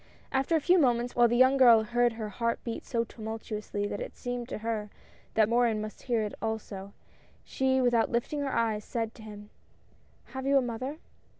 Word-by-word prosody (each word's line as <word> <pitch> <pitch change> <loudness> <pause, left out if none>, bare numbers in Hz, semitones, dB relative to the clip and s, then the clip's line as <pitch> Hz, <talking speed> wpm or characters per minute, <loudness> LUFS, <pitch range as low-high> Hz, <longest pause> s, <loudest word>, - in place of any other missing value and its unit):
After 270 +5 +1
a - - +4
few 360 +4 +4
moments, 245 -4 +1
while 240 0 +6
the 240 +1 +1
young 260 +2 +5
girl 235 -4 +7
heard 240 +1 +1
her 220 -2 -5
heart 230 +3 -1
beat 230 -2 -5
so 230 -1 0
tumultuously 220 -2 -5
that 205 0 -4
it - - -6
seemed 245 -1 -4
to - - -4
her 215 -2 -2 0.5
that 220 -1 +4
Morin 235 -1 +2
must 215 0 -7
hear 235 -4 0
it 210 - -4
also, 205 -3 -4 0.5
she 265 0 +1
without 240 -2 +3
lifting 240 +5 -1
her 280 -1 -2
eyes, 220 -3 0
said 225 -2 -3
to - - -14
him: 210 -1 -11 0.4
" - - -34
Have 265 0 -4
you 280 0 +5
a - - +4
mother 250 +5 -4
235 Hz, 200 wpm, -29 LUFS, 220-250 Hz, 0.5 s, girl